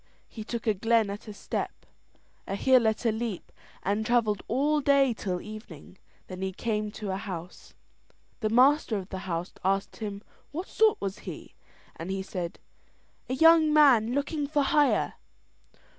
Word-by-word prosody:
He 220 - -8
took 235 +1 -5
a 220 - +3
glen 225 +1 +2
at 205 +2 -8
a 210 - -7
step, - - -5 0.6
a 195 - -2
hill 255 +2 +4
at 220 +2 -1
a 230 - +4
leap, 220 -3 -4 0.3
and 205 +3 0
travelled 220 -3 +1
all 295 +5 +1
day 275 -3 +4
till 185 -4 -3
evening. 190 -5 -11 0.3
Then 185 0 -8
he 190 0 -2
came 215 0 -2
to 205 -3 -5
a 190 - -2
house. 180 -3 -8 0.6
The 215 - 0
master 255 0 +4
of 190 0 -7
the 190 - -5
house 170 +2 -3
asked 195 +1 0
him 205 -2 -6 0.3
what 345 +6 -5
sort 435 -1 +3
was 195 -1 -4
he, - - -9 0.4
and 165 - -7
he 190 0 -2
said: 180 -3 -5 0.7
"A 255 - 0
young 320 +1 +6
man 260 -7 +5
looking 285 +1 -1
for 295 -1 +1
hire." 290 +1 +2
220 Hz, 165 wpm, -28 LUFS, 195-270 Hz, 0.7 s, young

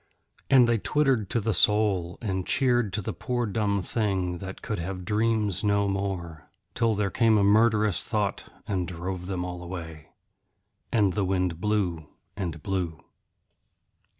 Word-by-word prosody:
And 130 -3 +7
they 115 -1 +2
twittered 135 -7 +1
to 120 - +1
the 110 0 0
soul 100 -3 +2
and 95 -3 -1
cheered 120 -6 +2
the 105 0 -3
poor 125 -1 -2
dumb 100 -2 0
thing 95 -6 -1
that 95 +1 -8
could 105 - -3
have 90 +1 -5
dreams 110 -1 +1
no 100 -1 +2
more, 95 -5 -4 0.2
till 115 -2 +1
there 100 -2 0
came 115 0 +4
a 100 - +3
murderous 105 -1 +3
thought 105 -4 -2 0.2
and 90 -3 -1
drove 90 +1 -5
them 90 -2 -2
all 90 -1 -6
away. 85 -3 -7 0.8
And 100 -5 +3
the 100 +1 0
wind 90 -3 -1
blew 90 -7 0 0.3
and 85 -6 -4
blew. 90 -5 -3
100 Hz, 150 wpm, -27 LUFS, 90-110 Hz, 0.8 s, And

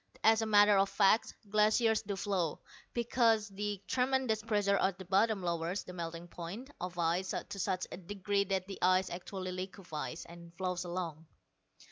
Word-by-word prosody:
As 220 0 +5
a 220 - -1
matter 205 -1 +6
of 195 0 +3
fact, 205 +3 +3
glaciers 215 +2 +3
do 200 -2 -4
flow, 190 -5 -1 0.3
because 230 -3 +2
the 205 0 -3
tremendous 255 -3 +1
pressure 205 -3 +2
at 190 -1 +1
the 190 - -9
bottom 195 +2 +2
lowers 170 +2 -1
the 180 - -9
melting 170 0 -5
point 190 +11 -7
of 180 0 -5
ice 175 +3 0
to 200 - -6
such 185 -1 0
a - - -5
degree 200 +2 -1
that 190 -1 -1
the 195 0 -8
ice 185 +1 +3
actually 185 +1 -5
liquefies, 180 -4 -5
and 170 0 -13
flows 180 -1 -2
along." 170 -3 -4
195 Hz, 165 wpm, -33 LUFS, 180-210 Hz, 0.3 s, matter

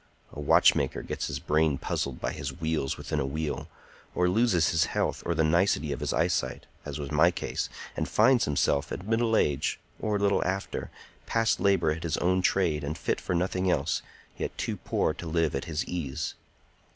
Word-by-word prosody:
A - - -8
watchmaker 75 - +3
gets - - -3
his - - -3
brain 75 -2 +1
puzzled 70 -1 -3
by - - -2
his 70 0 -4
wheels 80 -4 -1
within 75 - -3
a 70 - 0
wheel, 75 +2 -3 0.5
or 90 - +3
loses 95 -4 +3
his 80 - +3
health - - -1
or 85 - +1
the 80 - +2
nicety 80 -2 +2
of 70 - -3
his - - -2
eyesight, 65 - 0 0.2
as - - -5
was 70 -1 -5
my 80 +3 +5
case, 90 - -3 0.3
and - - -2
finds 130 -3 +4
himself 70 -1 +1
at 95 - -5
middle 115 0 +2
age, 70 -1 +1 0.2
or 105 -1 -1
a - - +1
little 100 0 +2
after, 95 +2 -3 0.4
past 115 -1 +2
labor 95 -6 +3
at 80 +2 -3
his 85 -3 -1
own 90 +1 +2
trade 85 -6 +1
and 75 +2 -3
fit - - -1
for 90 - -2
nothing 90 +1 0
else, 70 -6 +1 0.4
yet - - -4
too - - -2
poor - - 0
to 85 - -8
live 80 -1 +1
at 70 - -2
his 80 +1 -2
ease. 80 -4 -3
80 Hz, 195 wpm, -28 LUFS, 75-95 Hz, 0.5 s, my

